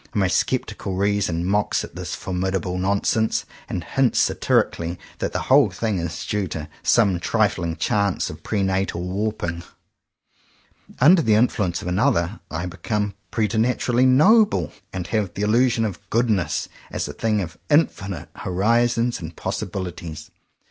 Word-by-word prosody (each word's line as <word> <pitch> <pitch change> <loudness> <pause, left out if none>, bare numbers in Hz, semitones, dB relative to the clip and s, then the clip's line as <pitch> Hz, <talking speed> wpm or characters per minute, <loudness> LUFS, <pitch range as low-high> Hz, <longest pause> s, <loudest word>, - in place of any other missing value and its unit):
My 100 -3 +3
sceptical 95 0 -1
reason 100 -3 0
mocks 105 +2 +1
at - - -10
this - - -4
formidable 90 0 -2
nonsense, 100 +3 +1 0.2
and 85 - -3
hints 135 +4 +1
satirically 85 +1 +1 0.2
that - - -2
the - - -2
whole 135 -4 +5
thing 100 +2 -2
is 85 -1 -4
due 105 -2 -1
to 80 -3 -5
some 100 -7 +3
trifling 85 -1 0
chance 100 +3 0
of - - -11
pre 105 -3 -1
natal 95 -2 -1
warping. 90 -3 -2 1.4
Under 165 +7 +7
the 110 -7 +3
influence 105 -6 +1
of - - -5
another, 90 +1 +1
I 80 +2 -3
become 105 +3 -2 0.2
preternaturally 120 +3 +1
*'noble," 150 - +4 0.2
and 90 -2 -4
have 100 -1 -2
the 100 - -2
il 105 - +1
lusion 120 0 +3
of 100 -4 -4
''goodness" 110 -8 +1 0.2
as - - -3
a - - -6
thing 110 -2 0
of 85 -3 -5
infinite 100 - +1
horizons 115 +5 +1
and 80 0 -8
possibilities. 85 -4 -5
100 Hz, 140 wpm, -23 LUFS, 90-115 Hz, 1.4 s, Under